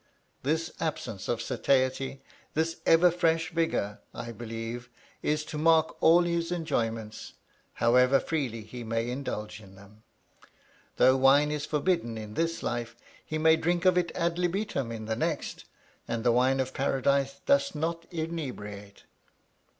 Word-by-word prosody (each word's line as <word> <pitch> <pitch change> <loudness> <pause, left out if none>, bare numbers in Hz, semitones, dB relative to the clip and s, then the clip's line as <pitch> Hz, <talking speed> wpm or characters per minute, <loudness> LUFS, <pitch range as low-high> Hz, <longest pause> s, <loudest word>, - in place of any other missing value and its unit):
This 160 +4 -1
absence 110 -10 -3
of 115 -1 -1
satiety, 135 +1 0 0.3
this 160 +1 0
ever 170 +2 +6
fresh 165 -1 +1
vigor, 160 -11 -1 0.2
I 120 - -5
believe, 115 +1 -6 0.3
is 150 0 0
to 150 - -5
mark 160 0 +4
all 170 +2 +6
his 170 0 -1
enjoyments, 115 -10 -3 0.4
however 125 +3 +4
freely 130 -9 -2
he 120 +3 -8
may 115 +1 -1
indulge 110 -5 -5
in 95 -2 -15
them. 100 +2 -17 1.0
Though 130 +1 +5
wine 140 +3 +5
is 150 0 -3
forbidden 150 -6 0
in 105 -1 -7
this 165 +5 -1
life, 120 -1 -3 0.3
he 155 - -4
may 160 +1 +5
drink 175 +2 0
of 185 -1 +5
it 175 -1 +1
ad 170 0 0
libitum 175 - -1
in 110 -1 -6
the 110 0 -1
next, - - -3 0.4
and 115 -1 -2
the 120 - +4
wine 130 +3 +3
of 130 0 -1
Paradise 140 +1 +1
doth 280 - +3
not 165 +2 -3
inebriate. 125 - -6
140 Hz, 145 wpm, -28 LUFS, 115-165 Hz, 1.0 s, ever